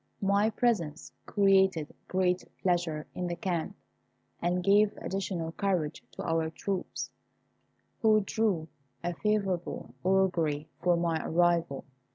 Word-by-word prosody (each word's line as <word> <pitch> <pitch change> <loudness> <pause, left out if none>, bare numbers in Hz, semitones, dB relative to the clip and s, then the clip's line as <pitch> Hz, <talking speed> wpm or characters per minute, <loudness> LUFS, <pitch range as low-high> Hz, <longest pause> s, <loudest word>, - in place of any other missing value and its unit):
My 200 +2 +3
presence 200 -10 0 0.2
created 190 -6 +3
great 185 -1 +1 0.2
pleasure 170 -4 +1
in 180 - -3
the 175 - -2
camp, 170 -2 -2 0.7
and 180 +1 0
gave 205 +2 +4
additional 185 -4 -3
courage 180 -5 -1
to - - -6
our 165 -1 0
troops, 190 +3 -4 0.9
who 215 -1 +5
drew 195 -6 0 0.4
a 175 - -1
favourable 195 -2 -1
augury 175 -6 +2
from 175 -1 +3
my 165 -2 0
arrival. 170 -4 +1
180 Hz, 115 wpm, -30 LUFS, 165-195 Hz, 0.9 s, who